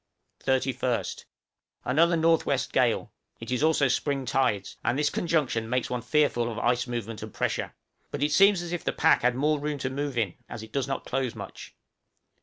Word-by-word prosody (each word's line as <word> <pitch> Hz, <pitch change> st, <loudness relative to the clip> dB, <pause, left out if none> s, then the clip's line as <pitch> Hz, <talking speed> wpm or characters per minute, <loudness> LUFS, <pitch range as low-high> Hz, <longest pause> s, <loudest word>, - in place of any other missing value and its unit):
31st. 130 Hz, -2 st, -1 dB, 0.6 s
Another 165 Hz, +6 st, +3 dB
N.W. 165 Hz, 0 st, +3 dB
gale; -, -, +1 dB, 0.3 s
it -, -, -7 dB
is 125 Hz, -, 0 dB
also 155 Hz, -2 st, +3 dB
spring 135 Hz, +1 st, -1 dB
tides, 115 Hz, -8 st, 0 dB
and 120 Hz, -, +1 dB
this 145 Hz, 0 st, +1 dB
conjunction 145 Hz, -10 st, 0 dB
makes 125 Hz, 0 st, -1 dB
one 125 Hz, -1 st, -2 dB
fearful 125 Hz, -3 st, +1 dB
of 110 Hz, -, -7 dB
ice 120 Hz, +2 st, +1 dB
movement 115 Hz, -2 st, -4 dB
and -, -, -7 dB
pressure; -, -, -2 dB, 0.3 s
but -, -, -3 dB
it 150 Hz, -, +1 dB
seems 195 Hz, +3 st, +5 dB
as 170 Hz, -, -6 dB
if 175 Hz, -, -3 dB
the -, -, -1 dB
pack 160 Hz, -, +4 dB
had 125 Hz, 0 st, +2 dB
more 150 Hz, +3 st, +1 dB
room 150 Hz, 0 st, -2 dB
to 130 Hz, -1 st, -3 dB
move 140 Hz, -1 st, -3 dB
in, 105 Hz, -7 st, 0 dB, 0.2 s
as 110 Hz, -, -7 dB
it 110 Hz, -, -12 dB
does 140 Hz, -2 st, -1 dB
not 135 Hz, -, -3 dB
close 130 Hz, -2 st, -2 dB
much. -, -, -9 dB
135 Hz, 190 wpm, -27 LUFS, 120-150 Hz, 0.6 s, seems